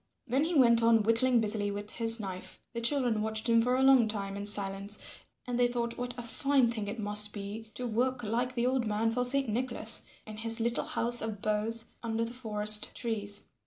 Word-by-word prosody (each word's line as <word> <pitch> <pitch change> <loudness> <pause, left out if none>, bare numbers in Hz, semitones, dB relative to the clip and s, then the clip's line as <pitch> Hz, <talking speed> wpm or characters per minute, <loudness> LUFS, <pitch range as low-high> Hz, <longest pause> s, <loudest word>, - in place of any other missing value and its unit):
Then 265 +5 0
he 340 +1 -3
went 235 -4 +4
on 230 -1 +3
whittling 230 +2 +3
busily 210 -1 0
with 205 +1 -6
his 230 0 +2
knife. 190 -3 -8
The 235 - -5
children 240 -3 +2
watched 220 +1 -3
him 230 -1 +3
for 250 +2 0
a 260 - 0
long 265 -4 +5
time 200 -2 -5
in 200 0 +2
silence, 200 0 +1 0.5
and 245 -1 -4
they 245 - +3
thought 235 -1 -4
what 245 0 -6
a 240 - -6
fine 265 +1 0
thing 215 -3 -5
it 205 +3 -6
must 210 -1 +2
be 210 +2 -8
to 250 - -5
work 245 +2 -2
like 240 +4 -3
the 240 0 -1
old 255 -2 -1
man 215 +2 -1
for 250 +2 -1
Saint 270 +2 +5
Nicholas, 230 -1 +1 0.2
in 215 0 -10
his 225 +1 -3
little 235 +1 -2
house 240 +1 +2
of 220 -2 -5
boughs 215 +2 -3
under 230 0 -3
the 230 - -8
forest 210 -3 +3
trees. 210 -3 -2
230 Hz, 210 wpm, -29 LUFS, 210-245 Hz, 0.5 s, long